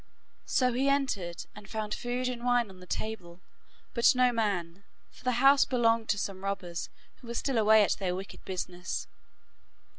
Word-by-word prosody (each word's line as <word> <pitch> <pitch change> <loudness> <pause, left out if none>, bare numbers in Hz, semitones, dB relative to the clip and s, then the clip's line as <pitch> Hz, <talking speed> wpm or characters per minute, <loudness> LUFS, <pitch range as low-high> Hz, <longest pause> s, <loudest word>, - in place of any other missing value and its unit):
So 250 -2 +2
he 265 +3 +2
entered 215 -12 -1
and 205 -1 -12
found 215 -1 -3
food 245 +1 -2
and 245 -1 -4
wine 245 -4 +2
on 185 - -15
the 180 - -13
table, 185 -6 -5 0.5
but 235 +3 +5
no 250 0 +4
man, 195 -5 -1 0.3
for - - -18
the 255 -1 +1
house 270 +3 +6
belonged 230 -3 +2
to 205 - +2
some 195 -1 -4
robbers, 180 -4 -3 0.3
who 245 - -15
were 235 - -5
still 255 -1 0
away 215 0 +6
at - - +1
their 180 -2 -1
wicked 190 +2 -8
business. 180 -1 -4
220 Hz, 175 wpm, -30 LUFS, 190-245 Hz, 0.5 s, house